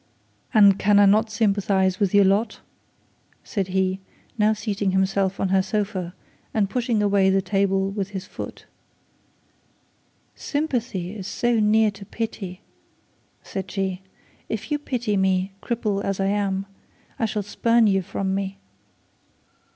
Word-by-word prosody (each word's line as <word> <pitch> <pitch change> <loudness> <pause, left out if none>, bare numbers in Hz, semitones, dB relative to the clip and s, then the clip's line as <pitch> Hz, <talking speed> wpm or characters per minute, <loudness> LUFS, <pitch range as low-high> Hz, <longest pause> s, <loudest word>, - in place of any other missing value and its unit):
'And 200 -4 +6
can 205 +1 +4
I 205 - +7
not 215 +3 +4
sympathise 200 -3 +1
with 200 -3 +2
your 205 -1 +5
lot?' 210 +3 +1 0.8
said 195 -4 -2
he, 190 0 0 0.4
now 215 -2 +3
seating 205 -3 -1
himself 190 0 +1
on 195 - 0
her 190 0 +4
sofa, 190 -3 -3 0.4
and 200 -3 +1
pushing 235 -4 0
away 200 -1 +3
the 195 0 +3
table 195 0 +1
with 195 -1 -3
his 190 -2 -6
foot. - - -8 1.7
'Sympathy 235 - -3
is 195 -3 -6
so 240 -1 +1
near 215 0 +4
to 200 0 -12
pity!' 195 -3 -5 0.8
said 190 -2 -5
she. 190 -1 -2 0.5
'If 220 +6 -4
you 295 - +1
pity 240 -7 -1
me, 190 0 +1
cripple 215 -4 -1
as 195 -1 -2
I 195 0 +1
am, 195 -1 -1 0.5
I 230 - +2
shall 210 0 -2
spurn 230 +3 +2
you 195 -2 +3
from 190 +1 -3
me.' 195 0 -3
200 Hz, 140 wpm, -23 LUFS, 190-215 Hz, 1.7 s, I